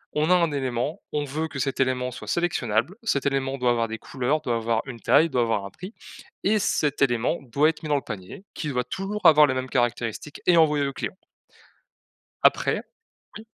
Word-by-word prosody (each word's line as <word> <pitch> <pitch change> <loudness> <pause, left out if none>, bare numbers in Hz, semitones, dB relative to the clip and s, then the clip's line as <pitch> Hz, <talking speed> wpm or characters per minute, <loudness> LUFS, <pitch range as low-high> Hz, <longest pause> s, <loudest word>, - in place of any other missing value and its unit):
on 155 +2 +1
a 180 - +6
un 170 -3 +2
élément, 130 +1 -2
on 150 - -1
veut 155 +4 -3
que 150 - -8
cet 135 0 -2
élément 130 -1 0
soit 120 - -9
sélectionnable, 160 - 0
cet 140 -12 0
élément 135 -1 0
doit 125 -2 +2
avoir 115 -1 +1
des 115 0 -5
couleurs, 135 +6 -1
doit 120 - -1
avoir 115 0 0
une 130 -4 -8
taille, 160 +8 +4
doit 125 -2 +2
avoir 110 -4 0
un 100 - -8
prix 185 +5 -10 0.5
et 210 +2 +3
cet 145 -7 0
élément 120 +3 +2
doit 140 +4 +2
être 160 - -5
mis 155 - -5
dans 145 - +3
le 140 - 0
panier, 105 - -8
qui 150 - -4
doit 125 -3 -1
toujours 195 +10 -5
avoir 150 -2 +8
la 130 - -1
même 130 0 -3
caractéristique 120 +2 -2
et 180 - +5
envoyer 150 -3 +4
au 140 - -4
client. 185 - -5 1.3
Après - - +3 0.6
oui? 220 - -12
135 Hz, 205 wpm, -25 LUFS, 120-155 Hz, 1.3 s, avoir